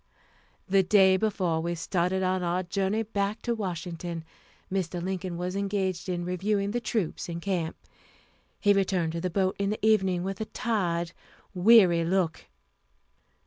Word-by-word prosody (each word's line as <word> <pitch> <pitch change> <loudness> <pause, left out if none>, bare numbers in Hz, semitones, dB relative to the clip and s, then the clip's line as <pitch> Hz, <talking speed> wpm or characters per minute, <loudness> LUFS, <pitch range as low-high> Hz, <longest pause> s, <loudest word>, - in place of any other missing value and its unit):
The 195 +1 +4
day 190 0 +5
before 185 -5 0
we 170 +1 -2
started 180 +2 0
on 185 0 +1
our 175 +1 0
journey 195 +4 0
back 205 0 -2
to 240 - 0
Washington, 175 -4 -4 0.5
Mr. 180 -2 -1
Lincoln 185 -1 -3
was 180 +2 -3
engaged 195 -3 -1
in 175 -1 -2
reviewing 200 +3 0
the 240 +2 -1
troops 205 -8 -2
in 170 0 -4
camp. 170 -3 -2 0.8
He 205 -1 +4
returned 185 -4 +1
to 165 0 -4
the 185 - -1
boat 190 +1 0
in 200 0 +1
the 215 0 -2
evening, 190 -5 +3
with 195 +2 -4
a - - -1
tired, 175 -8 -1 0.4
weary 180 -3 +6
look. 170 -2 0
185 Hz, 150 wpm, -28 LUFS, 175-200 Hz, 0.8 s, weary